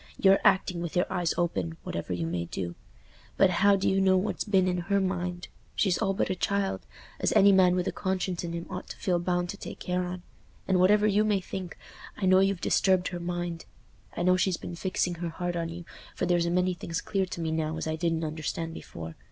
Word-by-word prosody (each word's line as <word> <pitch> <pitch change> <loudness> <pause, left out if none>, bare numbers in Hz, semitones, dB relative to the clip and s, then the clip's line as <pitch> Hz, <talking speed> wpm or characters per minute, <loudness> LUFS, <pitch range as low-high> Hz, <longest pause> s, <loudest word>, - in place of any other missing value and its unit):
You're 195 0 +5
acting 180 -2 +3
with 170 -2 -5
your 180 - +3
eyes 175 -3 0
open, 95 - -1
whatever 85 +2 -4
you 85 -2 -1
may 85 +1 -2
do; 85 0 -4 0.6
but 190 -1 +5
how 200 +3 +4
do 195 - 0
you 195 0 +3
know 190 -1 +4
what's 190 +3 -1
been 190 -3 +2
in 180 0 0
her 200 0 +3
mind? 180 -2 -2 0.3
She's 190 -4 +2
all 195 -3 0
but - - 0
a - - 0
child—as 200 +1 -2
any 200 -1 +7
man 185 -2 +5
with 180 -1 0
a - - +1
conscience 185 -2 -2
in 170 -1 -4
him 170 0 -4
ought 180 - -7
to - - -7
feel 180 -2 0
bound 175 0 -1
to 200 - -5
take - - -8
care 180 0 -1
on. 180 0 -5 0.4
And 190 -1 +3
whatever 205 +3 +5
you 210 0 +3
may 210 -2 +2
think, 185 -1 -6 0.4
I 195 - -1
know 185 0 +6
you've 195 -2 +2
disturbed 185 -2 +2
her 175 - -5
mind. 175 -1 -4 0.5
I - - 0
know 185 +1 +4
she's 185 -2 +1
been - - -7
fixing 180 0 -1
her 170 - -2
heart 175 +1 -3
on 165 -1 -2
you, 170 +1 -8 0.3
for - - -1
there's 175 -1 +2
a - - +1
many 180 +1 +2
things 170 0 -4
clear 195 -2 -1
to 175 - -6
me 160 -1 -1
now 160 0 -1
as - - -3
I 160 0 -1
didn't 165 0 -1
understand 160 +1 -3
before. 80 - -8
180 Hz, 230 wpm, -28 LUFS, 170-190 Hz, 0.6 s, any